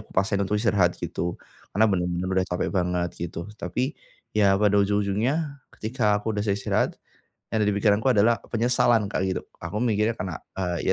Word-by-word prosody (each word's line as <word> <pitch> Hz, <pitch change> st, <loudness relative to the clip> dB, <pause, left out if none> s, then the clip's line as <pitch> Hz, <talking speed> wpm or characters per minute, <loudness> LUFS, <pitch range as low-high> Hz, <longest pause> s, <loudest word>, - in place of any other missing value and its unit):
aku -, -, -24 dB
paksain 100 Hz, +1 st, +2 dB
untuk 105 Hz, +2 st, 0 dB
istirahat 100 Hz, -5 st, +2 dB
gitu, 85 Hz, 0 st, -3 dB, 0.3 s
karena 110 Hz, +4 st, +3 dB
benar-benar 90 Hz, -1 st, -1 dB
udah 95 Hz, 0 st, +2 dB
capek 90 Hz, -, -1 dB
banget 90 Hz, -1 st, +1 dB, 0.2 s
gitu 85 Hz, -, -6 dB, 0.2 s
tapi, 130 Hz, +4 st, -1 dB, 0.4 s
ya 100 Hz, -2 st, +4 dB
pada 105 Hz, -1 st, +3 dB
ujung-ujungnya 110 Hz, +9 st, 0 dB, 0.2 s
ketika 110 Hz, -2 st, +1 dB
aku 110 Hz, +2 st, -2 dB
udah 105 Hz, -, -1 dB
selesai 100 Hz, -1 st, 0 dB
istirahat, -, -, +1 dB, 0.6 s
yang 110 Hz, -1 st, +1 dB
ada -, -, +2 dB
di -, -, 0 dB
pikiranku 105 Hz, +3 st, +2 dB
adalah 115 Hz, +2 st, +4 dB, 0.2 s
penyesalan 120 Hz, -2 st, +3 dB
Kak, -, -, -1 dB
gitu 95 Hz, -, -2 dB, 0.2 s
aku 85 Hz, +4 st, -6 dB
mikirnya 110 Hz, -1 st, +2 dB
karena, 90 Hz, -6 st, -4 dB, 0.2 s
eee, 90 Hz, -1 st, 0 dB
105 Hz, 175 wpm, -25 LUFS, 95-110 Hz, 0.6 s, ya